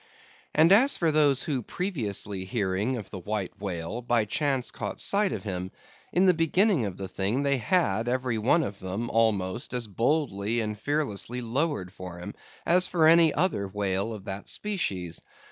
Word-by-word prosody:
And 160 +3 +6
as 255 +8 +6
for 165 -2 +2
those 145 -3 +3
who, 140 -6 -1
previously 105 - -3
hearing 100 +4 -1
of 105 - -8
the 95 - -6
White 105 +1 -4
Whale, 95 +3 -4
by 120 -2 +1
chance 135 +3 -1
caught - - -5
sight 200 0 +2
of - - -4
him; 95 -3 -4 0.4
in 180 +2 +3
the 185 - +6
beginning 165 - +2
of 95 -3 -5
the 95 - -5
thing 100 +9 -1
they 140 -2 +2
had 115 - +1
every 125 -2 -1
one 145 +10 +3
of 100 -5 -5
them, 95 +6 -4
almost, 110 0 0
as 120 -1 +1
boldly 115 -1 0
and 105 -1 -2
fearlessly 125 -4 -2
lowered 120 - -2
for 90 -3 -8
him, 90 - -7 0.3
as 180 +2 +4
for 165 -3 +2
any 165 -1 +6
other 150 - 0
whale 100 +1 -1
of 105 -3 -8
that 95 +1 -5
species. 95 - -3
115 Hz, 175 wpm, -27 LUFS, 100-155 Hz, 0.4 s, And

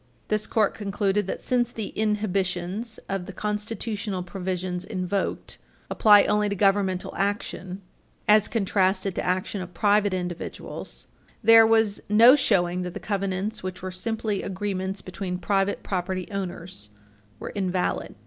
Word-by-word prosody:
This 215 0 0
Court 215 -3 +2
concluded 200 -1 -1
that, - - -4
since 245 -2 +1
the 220 -4 -4
inhibitions 205 0 -1
of 195 -2 -3
the - - -6
constitutional 210 -1 -3
provisions 180 -1 -3
invoked 190 0 -3 0.3
apply 205 -2 +7
only 210 0 +2
to 200 - -1
governmental 195 -2 +1
action, 195 -1 -3 0.4
as 210 0 +6
contrasted 195 -2 +1
to - - -2
action 185 +2 -1
of 180 -1 -9
private 205 +1 +3
individuals, 180 -2 -5 0.4
there 225 0 +8
was 220 -2 +3
no 230 +5 +8
showing 180 -9 +2
that 180 -1 -5
the - - -4
covenants, 200 +1 -2
which 185 0 -6
were 185 - -3
simply 215 +2 -2
agreements 195 0 -3
between 185 -1 -4
private 195 +2 0
property 185 -1 -2
owners, 180 - -4 0.5
were - - -6
invalid. 185 -2 -1
195 Hz, 135 wpm, -25 LUFS, 185-210 Hz, 0.5 s, there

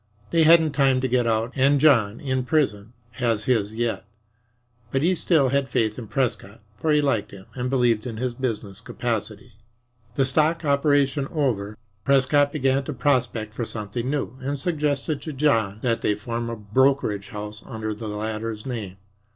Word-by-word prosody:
They 165 - +3
hadn't 160 -1 +6
time 135 -2 +3
to 130 - +1
get 125 -1 +1
out, 115 +1 0
and 140 +1 +3
John, 115 -8 +4
in 130 -2 -1
prison, 125 -7 0 0.3
has 115 -3 +1
his 110 -3 0
yet. 115 0 -1 0.9
But 135 +1 0
he 180 +3 +3
still 160 -6 +2
had 140 0 0
faith 110 +1 0
in 115 - -8
Prescott, 115 -4 -2 0.2
for 155 +9 -1
he 150 0 +4
liked 115 -8 0
him 95 -1 -12
and 125 0 -3
believed 120 -4 +2
in 115 -3 -6
his 125 +1 -2
business 115 -6 -4
capacity. - - -4 0.6
The 135 - +2
stock 155 +4 +1
"operation" 140 -1 +2
over, 110 -10 -1 0.3
Prescott 140 +1 +3
began 135 -2 +1
to 150 - -4
prospect 125 -5 0
for 120 - -3
something 115 +2 -4
new, 135 -3 -3
and 140 +2 -3
suggested 150 -1 -1
to 155 - -6
John 115 -8 +1
that 115 -2 0
they 105 - +1
form 115 +3 -4
a 115 - -3
brokerage 105 -1 +1
house 105 0 -7
under 110 -3 -4
the 110 +1 -7
latter's 110 +1 -4
name. 110 -8 -5
125 Hz, 170 wpm, -24 LUFS, 110-140 Hz, 0.9 s, hadn't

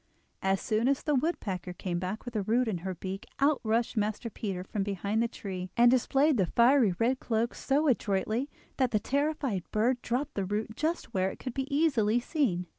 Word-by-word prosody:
As 190 0 +1
soon 220 +3 0
as 275 0 +1
the 300 - +1
woodpecker 205 - -1
came 175 0 -3
back 190 +6 -4
with 245 - -6
the 215 - 0
root 230 +5 +1
in 195 -6 -1
her 185 +2 -4
beak 190 +3 -6
out 285 0 +3
rushed 225 +2 0
Master 215 +2 -1
Peter 195 -5 -4
from 200 +2 -3
behind 200 +2 -1
the 235 - +2
tree 185 -5 -6
and 240 0 +7
displayed 270 +3 +3
the 190 -4 +2
fiery 235 -4 +4
red 250 +5 +1
cloak 230 0 0
so 290 +3 +1
adroitly 225 +2 0 0.3
that 260 -2 +2
the 215 - +1
terrified 280 -5 -1
bird 240 +4 +1
dropped 255 +4 -2
the 195 - -2
root 215 +3 -3
just 315 -4 -2
where 190 0 +1
it - - -8
could 255 - -6
be 270 +3 -3
easily 260 -7 +3
seen. 240 - 0
225 Hz, 200 wpm, -29 LUFS, 195-265 Hz, 0.3 s, and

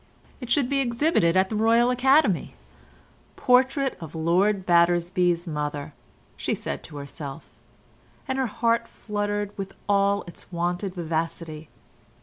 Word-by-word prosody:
It 250 -4 -8
should 280 -2 +3
be 280 +1 0
exhibited 240 - +2
at 190 0 +3
the 220 - -3
Royal 230 +3 +4
Academy: 250 - +3 0.8
'Portrait 260 +2 +2
of 160 0 -8
Lord 185 +5 +1
Battersby's 175 0 +2
mother,' 150 -2 -4 0.4
she - - -2
said - - -5
to 150 - -10
herself, 140 +1 -8 0.8
and 265 0 -1
her 260 - +1
heart 230 +1 0
fluttered 205 -1 -3
with 195 0 -5
all 200 0 +2
its 175 - -13
wonted 175 +2 -2
vivacity. 160 -2 -4
195 Hz, 130 wpm, -25 LUFS, 170-235 Hz, 0.8 s, Royal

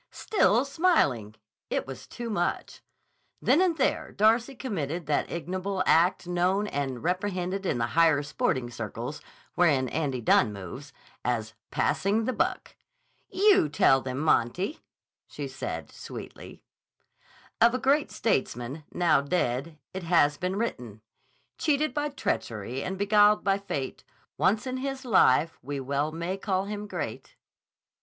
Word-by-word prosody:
Still 245 - +2
smiling! 210 - +1 0.3
It - - -1
was 135 -1 -9
too 235 -1 -6
much. 175 -4 -2 0.6
Then 335 - +3
and 355 -3 +2
there - - 0
Darcy 230 +5 +2
committed 175 - -3
that 150 0 0
ignoble 185 +3 -2
act 175 +3 +3
known 180 +3 +1
and 135 - -3
reprehended 185 +1 -1
in - - 0
the 115 - +1
higher 160 -2 +4
sporting 130 -4 -1
circles, 115 +5 -6 0.3
wherein 145 -7 +3
Andy 145 -5 -1
Dunne 110 -1 +3
moves, 105 +9 -8 0.3
as 115 -3 -1 0.2
"passing 210 +3 +1
the 255 - 0
buck." - - -2 0.5
"You 390 - +4
tell 135 -2 +4
them, 130 +1 -4
Monty," 155 - +1 0.5
she - - -6
said - - -6
sweetly. - - -10 1.0
Of 235 +2 +6
a - - +2
great 280 +3 +2
statesman, 130 - -2
now 170 -5 +3
dead, 140 0 -1 0.2
it 190 - -4
has 165 -4 +3
been 180 +4 -2
written: 125 - -4 0.6
Cheated 305 0 +1
by 295 0 -1
treachery 120 - -3
and 190 - -4
beguiled 205 +1 +4
by 195 0 +2
Fate, 140 -10 -5 0.3
Once 210 +4 +2
in 255 0 -3
his 270 0 -4
life 165 - +4
we 140 +2 -4
well 140 +3 -1
may 170 +4 -3
call 195 -1 -1
him 210 0 -5
great. - - -6
175 Hz, 135 wpm, -27 LUFS, 135-210 Hz, 1.0 s, Of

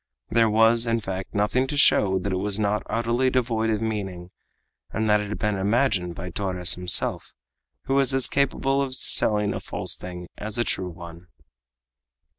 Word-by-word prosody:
There 115 -1 +3
was, 115 +2 +4
in 115 0 +1
fact, 95 -1 -6
nothing 105 +6 +1
to 145 +1 -4
show 95 -8 +4
that 95 +1 -3
it - - 0
was 100 +2 -1
not 105 0 0
utterly 120 +3 +1
devoid 115 -3 0
of 110 0 -1
meaning, 95 -5 -4 0.6
and 110 0 -2
that 105 0 +3
it 105 - -6
had 105 - -4
been 105 -1 -1
imagined 95 -4 0
by 90 0 -7
Torres 90 -1 +1
himself, 90 0 -1 0.5
who 135 - -2
was 140 0 +3
as 135 -1 +3
capable 135 0 0
of 135 -2 -2
selling 105 -4 +2
a - - -4
false - - -3
thing 90 -1 -8
as 105 +1 -5
a 120 - +2
true 95 -5 -2
one! 85 +1 -11
105 Hz, 180 wpm, -24 LUFS, 95-120 Hz, 0.6 s, was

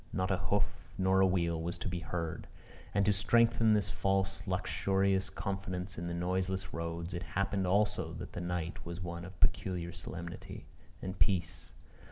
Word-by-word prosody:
Not 95 +1 0
a 95 - +3
hoof 100 +3 -1
nor 95 0 +4
a 95 - +7
wheel 85 -3 +1
was 85 +2 -2
to 85 - -4
be 90 -2 -2
heard. 85 -2 -3 0.4
And 100 -1 +3
to 105 - +5
strengthen 115 +2 +4
this 100 -2 +1
false 95 0 +1
luxurious 95 0 +1
confidence 95 -1 -3
in 85 - -3
the 85 - -2
noiseless 95 +1 -1
roads, 85 +1 -3
it 85 - -2 0.2
happened 100 -1 +1
also 105 +3 +2
that - - -7
the - - -4
night 85 -1 -3
was 85 0 -5
one 85 -1 -4
of 90 -1 -11
peculiar 85 0 +1
solemnity 85 0 -7 0.4
and 95 0 -4
peace. 90 - +1
95 Hz, 170 wpm, -33 LUFS, 85-95 Hz, 0.4 s, a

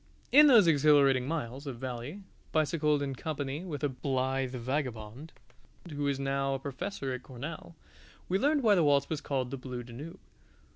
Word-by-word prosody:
In 300 +2 +8
those 235 -8 +7
exhilarating 140 -4 +4
miles 140 -3 -4
of 130 -3 -5
valley, 130 +9 -6 0.3
bicycled 150 -2 +1
in 135 -1 -3
company 145 +2 -4
with 155 -5 -6
a - - +3
blithe 130 0 -1
vagabond 125 +1 -4 0.6
who 145 -1 -2
is 140 -1 0
now 135 0 0
a - - -4
professor 135 +1 -4
at 125 - -5
Cornell, 145 +7 -8 0.5
we 190 +2 +1
learned 290 +3 +2
why 215 -3 +5
the 175 -4 +4
waltz 140 -1 +3
was 155 -2 -2
called 130 -4 -2
"The 135 - -4
Blue 125 -1 -6
Danube." 130 +8 -9
140 Hz, 165 wpm, -30 LUFS, 130-155 Hz, 0.6 s, In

